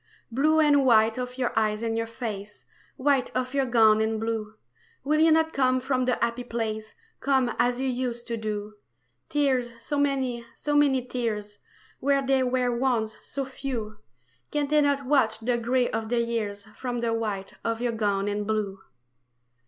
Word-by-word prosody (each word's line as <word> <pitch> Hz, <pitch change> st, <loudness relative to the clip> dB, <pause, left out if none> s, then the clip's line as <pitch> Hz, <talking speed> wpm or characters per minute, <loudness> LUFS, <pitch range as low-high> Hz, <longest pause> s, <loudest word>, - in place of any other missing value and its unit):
Blue 305 Hz, +6 st, +3 dB
and 290 Hz, -2 st, +5 dB
white 225 Hz, -2 st, +4 dB
of 250 Hz, 0 st, -5 dB
your 250 Hz, -2 st, -1 dB
eyes 215 Hz, 0 st, +1 dB
and 225 Hz, -1 st, -1 dB
your 230 Hz, 0 st, -1 dB
face, 210 Hz, -3 st, -6 dB, 0.3 s
White 275 Hz, -1 st, +2 dB
of 255 Hz, +1 st, -1 dB
your 275 Hz, -2 st, +1 dB
gown 220 Hz, -3 st, +5 dB
and 220 Hz, 0 st, 0 dB
blue, 220 Hz, -1 st, -3 dB, 0.5 s
Will 305 Hz, +3 st, +2 dB
you 320 Hz, +1 st, +6 dB
not 320 Hz, 0 st, +3 dB
come 255 Hz, -1 st, +2 dB
from 255 Hz, -1 st, 0 dB
the 250 Hz, -1 st, +2 dB
happy 235 Hz, +1 st, -1 dB
place, 220 Hz, -2 st, -4 dB, 0.2 s
Come 265 Hz, -4 st, +1 dB
as 245 Hz, +1 st, +2 dB
you 265 Hz, -, 0 dB
used 245 Hz, -2 st, -2 dB
to 235 Hz, -, -3 dB
do? 210 Hz, -1 st, -4 dB, 0.6 s
Tears 260 Hz, -5 st, +1 dB
so 285 Hz, +5 st, -2 dB
many, 265 Hz, -4 st, 0 dB
so 295 Hz, 0 st, -2 dB
many 270 Hz, -4 st, +3 dB
tears 215 Hz, -5 st, -3 dB, 0.4 s
Where 275 Hz, 0 st, +2 dB
there 265 Hz, -1 st, +2 dB
were 250 Hz, -1 st, +1 dB
once 235 Hz, -4 st, 0 dB
so 275 Hz, -1 st, -4 dB
few 245 Hz, -5 st, -5 dB, 0.5 s
Can 295 Hz, -1 st, 0 dB
they 300 Hz, 0 st, +4 dB
not 280 Hz, -1 st, +1 dB
wash 255 Hz, -6 st, +3 dB
the 235 Hz, +2 st, 0 dB
gray 245 Hz, +1 st, +1 dB
of 220 Hz, 0 st, -3 dB
the 240 Hz, 0 st, +1 dB
years 215 Hz, -4 st, -2 dB
From 245 Hz, -2 st, -3 dB
the 230 Hz, -1 st, 0 dB
white 210 Hz, -4 st, -3 dB
of 230 Hz, 0 st, -1 dB
your 240 Hz, 0 st, 0 dB
gown 205 Hz, -3 st, 0 dB
and 205 Hz, 0 st, -2 dB
blue? 210 Hz, -3 st, -1 dB
240 Hz, 175 wpm, -26 LUFS, 220-265 Hz, 0.6 s, you